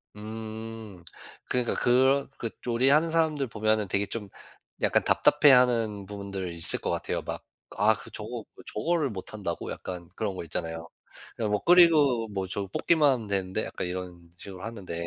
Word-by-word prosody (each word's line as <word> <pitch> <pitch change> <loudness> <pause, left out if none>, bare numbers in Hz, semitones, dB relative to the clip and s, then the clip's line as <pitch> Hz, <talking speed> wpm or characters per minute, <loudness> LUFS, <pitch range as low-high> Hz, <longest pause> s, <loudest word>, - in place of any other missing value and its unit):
음 110 -2 -8 0.5
그러니까 125 -2 0
그런 130 +3 +3
그 115 - -3 0.2
요리하는 135 +7 +3
사람들 155 -5 +1
보면은 110 -2 0
되게 100 +2 +1
좀 105 -2 -6 0.5
약간 - - +2
답답해하는 125 -8 +4
부분들 100 -3 -5
있을 85 -1 +3
것 - - -3
같아요. - - -2
막 - - -5 0.4
아 - - +5
그 - - -9
'저거 - - -6 0.3
저거를 155 +5 0
못한다고?' 95 -3 -5
약간 90 -2 -7
그런 100 -4 -2
거 - - -5
있잖아요. 80 0 -4 0.5
'그냥 110 -2 -2
뭐 105 - +1
끓이고 155 -10 +5
뭐 95 -2 -3
저거 100 +1 -4
볶기만 150 - +3
하면 115 -4 -5
되는데, 95 +1 -1
약간 90 - -5
이런 90 -2 -7
식으로 95 -1 -9
하는데.' 105 -6 -7
110 Hz, 340 characters per minute, -27 LUFS, 95-125 Hz, 0.5 s, 아